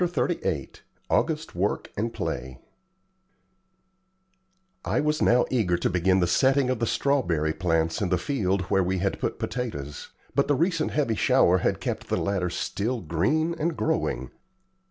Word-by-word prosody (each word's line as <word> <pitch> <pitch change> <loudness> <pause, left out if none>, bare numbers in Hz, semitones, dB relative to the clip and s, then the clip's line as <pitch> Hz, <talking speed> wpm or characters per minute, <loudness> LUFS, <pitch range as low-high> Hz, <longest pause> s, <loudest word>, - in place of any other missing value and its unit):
CHAPTER 180 +1 0
XXXVIII 80 - -3 0.4
AUGUST - - 0
WORK - - -1
AND 115 +3 -1
PLAY 65 - -4 2.3
I - - 0
was 150 +1 0
now 120 +1 +4
eager 100 -9 +2
to - - 0
begin 95 +2 +2
the 90 - +3
setting 130 +8 +3
of 130 - -2
the 115 - 0
strawberry 90 - +1
plants 80 -1 0
in 100 - 0
the 90 - +2
field 100 -4 0
where 95 +1 +1
we 95 +1 0
had 95 +1 -1
put - - -2
potatoes, 75 - -5 0.2
but 140 - +2
the 145 - +3
recent 165 +1 +1
heavy 140 -7 0
shower 90 -3 +4
had - - 0
kept - - -4
the - - 0
latter 95 -3 0
still 110 +7 -2
green 100 - +1
and 165 +1 -1
growing. 160 0 -1
100 Hz, 155 wpm, -26 LUFS, 90-140 Hz, 2.3 s, now